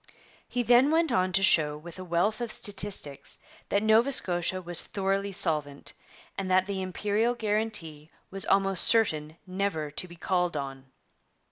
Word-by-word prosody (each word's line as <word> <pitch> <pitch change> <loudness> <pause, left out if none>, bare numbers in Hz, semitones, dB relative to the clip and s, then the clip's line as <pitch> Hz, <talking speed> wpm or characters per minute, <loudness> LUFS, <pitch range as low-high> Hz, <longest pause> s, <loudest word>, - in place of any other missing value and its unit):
He 245 - -2
then 245 +4 +5
went 325 -1 +1
on 185 -5 +1
to 195 - +2
show 150 -5 +3
with 170 +3 -11
a - - -6
wealth 185 +6 -1
of 235 -2 -3
statistics 195 -10 -1 0.3
that 200 - +1
Nova 220 +5 +3
Scotia 180 -5 +3
was 175 -2 -1
thoroughly 195 0 -2
solvent, 150 -7 -1 0.5
and 190 -1 -4
that 185 0 +3
the 195 -1 -4
Imperial 210 +5 -1
guarantee 210 -9 -2 0.2
was 195 0 -4
almost 195 -2 +3
certain 160 -9 +3
never 185 -5 -3
to 180 - -5
be 175 - -13
called 180 -2 -1
on. 135 -1 -6
190 Hz, 155 wpm, -27 LUFS, 165-210 Hz, 0.5 s, then